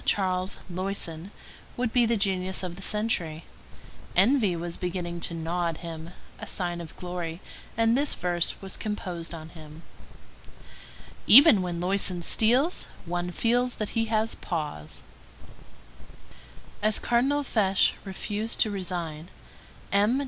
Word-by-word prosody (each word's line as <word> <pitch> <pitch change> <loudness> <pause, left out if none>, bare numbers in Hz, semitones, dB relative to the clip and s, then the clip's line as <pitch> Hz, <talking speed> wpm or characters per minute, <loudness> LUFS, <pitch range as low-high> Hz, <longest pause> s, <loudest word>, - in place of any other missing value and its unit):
Charles 185 -1 +1
Loyson 185 -2 -3 0.5
would 245 -2 -1
be 245 -2 +4
the 230 0 +2
genius 190 -2 0
of 175 -2 -4
the 195 - -10
century; 185 -7 -1 0.7
envy 205 -1 +4
was 170 0 -4
beginning 175 -1 -3
to 170 - -1
gnaw 170 +2 -1
at 165 -2 -3
him—a 165 0 -9
sign 175 -2 -1
of 165 -2 -10
glory; 175 -2 -5 0.4
and 230 0 +4
this 285 +2 +3
verse 175 -1 0
was 190 - -3
composed 180 -6 -4
on 160 -2 -8
him:— 155 0 -12 1.4
"Even 260 - +9
when 175 -2 -3
Loyson 180 -1 0
steals, 250 - +2 0.2
one 175 +1 -2
feels 245 +6 +1
that 215 - -3
he 225 -1 0
has 220 0 +1
paws." 150 - -4 1.8
As 215 0 +3
Cardinal 270 +5 +2
Fesch 195 -7 +3
refused 210 +3 -3
to 215 - +3
resign, 175 -4 -4 0.6
M. 210 +6 +3
185 Hz, 125 wpm, -27 LUFS, 170-220 Hz, 1.8 s, Even